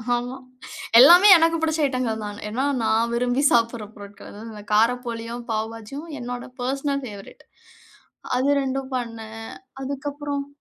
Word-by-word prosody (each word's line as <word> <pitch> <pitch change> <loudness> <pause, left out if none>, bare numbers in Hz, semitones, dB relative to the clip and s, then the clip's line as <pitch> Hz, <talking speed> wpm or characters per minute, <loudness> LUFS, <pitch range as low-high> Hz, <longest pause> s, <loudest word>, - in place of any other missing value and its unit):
ஆமா. 245 +2 -4 0.6
எல்லாமே 350 +9 +9
எனக்கு 330 0 +2
புடிச்ச 320 0 0
ஐட்டங்கள் 250 -5 -2
தான. 205 0 -7
ஏன்னா, 255 +6 -1 0.2
நான் 225 +1 +1
விரும்பி 245 +2 0
சாப்புட்ற 230 -2 +1
பொருட்கள் 205 0 -12 0.2
வ - - -9
காரப்போலியும், 235 +1 0
பாவுபாஜியும் 225 +8 -5
என்னோட 245 0 -6 0.2
பெர்சனல் 275 +2 -2
ஃபேவரைட். 205 -4 -11 0.9
அது 270 +3 +1
2ம் 270 0 -3
பண்ணேன். 225 -2 -7 0.3
அதுக்கப்பறம் 280 +1 -4
245 Hz, 120 wpm, -23 LUFS, 225-275 Hz, 0.9 s, எல்லாமே